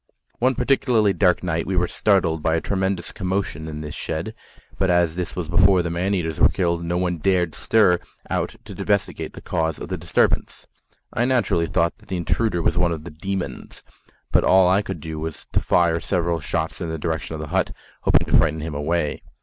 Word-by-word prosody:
One 130 +2 +2
particularly 115 -7 +2
dark 90 -3 +2
night 85 -2 -1
we 95 - -1
were 90 0 +2
startled 90 -7 +1
by 80 +1 +1
a - - +2
tremendous 95 -1 -2
commotion 95 -4 -3
in 75 -1 -6
this 75 -1 -6
shed, - - -4 0.5
but 95 - +2
as 85 -2 +3
this 90 -1 -4
was 90 -3 -3
before 90 +2 +4
the 85 - -2
man 90 +4 0
eaters 80 -4 -2
were - - +6
killed, 85 -2 0
no 85 +1 -1
one 90 -2 -1
dared 90 -2 +1
stir 90 -6 +3 0.3
out - - -2
to - - -9
investigate 100 -2 -1
the - - -10
cause 80 -1 -1
of - - -8
the - - -2
disturbance. - - 0 0.5
I 120 - +1
naturally 120 -10 +1
thought 85 0 0
that - - -21
the 95 - -2
intruder 85 +1 0
was - - +1
one 90 -1 +2
of 80 -2 -4
the 90 - -8
"demons," 95 +4 -5 0.5
but - - +4
all 95 -1 +5
I 95 +3 +4
could 95 -6 -6
do 80 0 -5
was 80 0 -6
to - - +2
fire 85 -1 +2
several 85 -2 0
shots 80 +3 -3
in 85 - -3
the 80 - -3
direction 80 0 -3
of - - -6
the 75 -1 -6
hut, - - +2 0.3
hoping - - +3
to - - +1
frighten 80 0 +3
him 80 0 -5
away. 75 +1 -1
85 Hz, 210 wpm, -22 LUFS, 80-95 Hz, 0.5 s, were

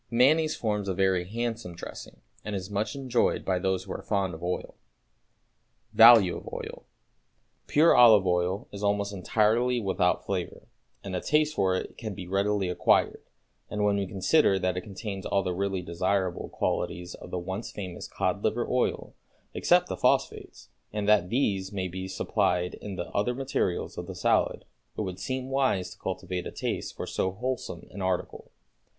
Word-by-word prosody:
Mayonnaise 150 +7 +4
forms 105 -3 -2
a 95 - -1
very 95 -2 +2
handsome 115 -3 -4
dressing, 85 - -9 0.2
and 105 -1 -4
it - - 0
is 95 +1 -7
much 105 +4 -1
enjoyed 130 -3 0
by 95 -1 +1
those 95 0 0
who 95 - -9
are - - -4
fond 100 -3 -1
of 80 - -9
oil. 90 +1 -3 1.2
=Value 115 -6 +8
of - - -9
Oil.= - - -7 0.8
Pure 160 +3 +5
olive 110 -5 +7
oil 90 +4 0
is 100 - -8
almost 100 0 0
entirely 110 +6 +2
without 95 -4 +1
flavor, 95 -3 -4 0.4
and 95 -2 -5
a 90 - -2
taste 150 +1 +2
for 95 -6 +1
it - - -5
can 110 -4 -5
be 90 - -7
readily 100 +1 0
acquired; 90 - +2 0.5
and, 105 0 -2
when 105 -1 +3
we 100 -1 -1
consider 95 - +3
that 90 -1 0
it 90 - -2
contains 100 0 -6
all 100 -1 +1
the 90 - -1
really 95 0 -2
desirable 95 +1 -1
qualities 90 +1 -2
of - - -11
the - - -3
once 95 +5 -4
famous 95 -4 -7
cod 95 +2 -2
liver 110 +2 0
oil, 125 -1 -1 0.4
except - - +3
the - - -3
phosphates, - - 0 0.2
and 105 -1 -3
that 105 -4 +4
these 100 -6 0
may 95 -2 -2
be 95 +1 -6
supplied 90 -1 0
in 100 -2 -7
the 85 - -3
other 115 +5 0
materials 130 -9 -2
of - - -6
the - - -7
salad, - - +1 0.3
it - - -1
would 95 -3 -4
seem 130 +2 -4
wise 130 -9 +1
to - - -13
cultivate 90 -1 -4
a - - -6
taste - - -4
for - - -5
so 95 - -1
wholesome 120 -5 -4
an 100 - -7
article. 95 -1 -2
100 Hz, 180 wpm, -28 LUFS, 90-110 Hz, 1.2 s, =Value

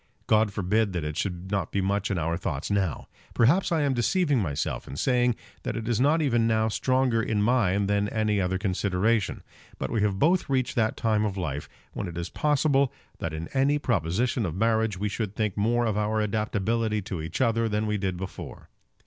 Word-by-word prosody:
God 110 -1 +3
forbid 100 +2 0
that 90 -3 -2
it 75 0 -3
should 90 +1 -3
not 100 -5 -1
be 100 - 0
much 100 +1 0
in 95 - -1
our 85 0 0
thoughts 80 -1 -3
now! 95 -7 -1 0.3
Perhaps 145 +13 +3
I 160 -3 +2
am 140 -2 +2
deceiving 145 +3 +2
myself 75 -9 -2
in - - -7
saying 125 - +2 0.3
that - - -3
it 115 -1 -4
is 120 -1 +1
not 155 +4 +3
even 120 -5 +2
now 110 0 +2
stronger 130 0 +1
in 105 -2 0
mine 100 -4 +2
than 100 +1 +1
any 110 -2 +1
other 95 0 0
consideration. 100 +3 0 0.3
But - - -4
we 110 - 0
have 100 -2 +1
both 170 - +2
reached 130 -2 0
that 110 -2 +1
time 110 -2 +1
of 100 -2 -2
life, 75 -6 -3 0.2
when 100 - -4
it 85 -1 -7
is 85 0 -3
probable 140 -2 +2 0.3
that 85 - -3
in 80 +1 -5
any 140 +2 +3
proposition 115 - 0
of 85 -5 -3
marriage 110 -1 +1
we 105 +3 -1
should 105 0 -3
think 105 -3 -1
more 120 +3 +1
of 110 -3 0
our 110 +1 0
adaptability 110 0 0
to 90 -3 -4
each 80 +2 -5
other 115 -2 +2
than 105 +1 0
we 105 -1 -1
did 95 -2 -2
before. 95 0 -8
105 Hz, 205 wpm, -26 LUFS, 95-120 Hz, 0.3 s, God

